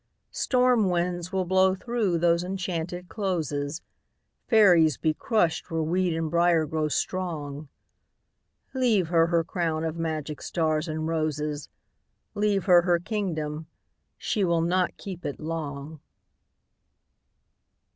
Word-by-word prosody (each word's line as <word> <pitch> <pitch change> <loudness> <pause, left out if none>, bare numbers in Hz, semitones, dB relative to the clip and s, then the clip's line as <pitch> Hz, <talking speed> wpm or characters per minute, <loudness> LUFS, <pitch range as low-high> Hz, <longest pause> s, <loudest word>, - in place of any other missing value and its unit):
Storm 250 -5 +2
winds 175 0 -1
will 190 -1 0
blow 190 +1 +3
through 215 -4 -1
those 170 +1 +2
enchanted 180 -1 -4
closes, 160 - -3 0.6
Fairies 175 - +5
be 160 -1 +1
crushed 180 - 0
where 165 -2 -1
weed 175 +1 0
and 160 -1 -2
briar 170 -1 +3
grow 155 0 -1
strong... 150 -4 -3 1.0
Leave 230 -10 +2
her 165 -1 +4
her 170 -1 +2
crown 165 -2 -2
of 165 +1 -3
magic 155 -2 -3
stars 155 -1 -1
and 155 0 -3
roses, 150 -2 -2 0.6
Leave 205 -2 +1
her 180 -3 +7
her 175 0 +2
kingdom—she 170 +1 -4
will 170 -2 +2
not 180 +2 0
keep 185 -3 -8
it 145 -2 -4
long! 155 -1 -5
170 Hz, 115 wpm, -26 LUFS, 155-185 Hz, 1.0 s, her